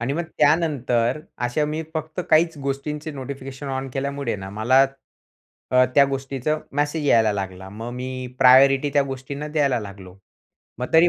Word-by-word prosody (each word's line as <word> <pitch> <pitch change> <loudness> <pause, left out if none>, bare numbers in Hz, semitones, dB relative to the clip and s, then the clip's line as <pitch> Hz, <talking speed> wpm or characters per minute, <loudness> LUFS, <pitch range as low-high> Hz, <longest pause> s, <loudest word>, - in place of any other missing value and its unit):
आणि 120 +3 -1
मग 170 - -1 0.2
त्यानंतर 130 -6 +2 0.3
अशा 150 +5 0
मी 155 +2 -3
फक्त 160 +2 -4
काहीच 165 0 +4
गोष्टींचे 150 +3 -3
नोटिफिकेशन 135 0 -7
ऑन 135 0 -3
केल्यामुळे 140 -3 -2
ना 95 0 -8
मला 120 +6 +4 0.9
अ, 130 0 +6
त्या 140 - +7
गोष्टीचा 135 +2 -2 0.2
मेसेज 145 +1 -1
यायला 110 -5 +4
लागला. 95 -1 -5
मग 115 +4 -7
मी 130 0 -5
प्रायोरिटी 135 +2 +6
त्या 145 - +5
गोष्टींना 140 +2 -6
द्यायला 140 -5 +1
लागलो. 100 -3 -10 0.6
मग 125 - -5
तरी 165 +2 +6
135 Hz, 150 wpm, -23 LUFS, 125-145 Hz, 0.9 s, त्या